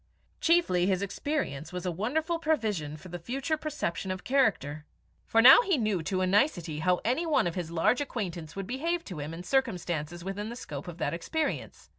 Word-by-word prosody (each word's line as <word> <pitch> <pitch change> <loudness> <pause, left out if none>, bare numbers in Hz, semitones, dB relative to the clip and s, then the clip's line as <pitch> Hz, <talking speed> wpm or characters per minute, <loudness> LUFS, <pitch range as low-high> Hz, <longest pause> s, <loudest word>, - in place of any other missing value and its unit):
Chiefly, 325 - +3
his 190 0 +1
experience 200 - -3
was 180 0 -5
a 180 - 0
wonderful 310 - -1
provision 210 - -1
for 180 +4 -12
the 175 +1 -6
future 270 - -2
perception 295 - -3
of 185 0 -4
character; 205 - +1 0.4
for 225 0 +4
now 265 - +10
he 390 -9 +1
knew 215 -7 0
to 185 +4 -1
a - - +3
nicety 185 - +1
how 180 +3 +2
any 260 +9 +1
one 300 - +3
of 170 - -1
his 175 -2 -4
large 170 - +2
acquaintance 175 - -4
would 195 -1 -4
behave 330 - -1
to 180 -6 -7
him 145 +2 -5
in 165 +2 -7
circumstances 175 - -1
within 200 +3 -4
the 235 - -6
scope 145 - -7
of 175 -1 -7
that - - -1
experience. 310 - -3
195 Hz, 195 wpm, -29 LUFS, 170-270 Hz, 0.4 s, now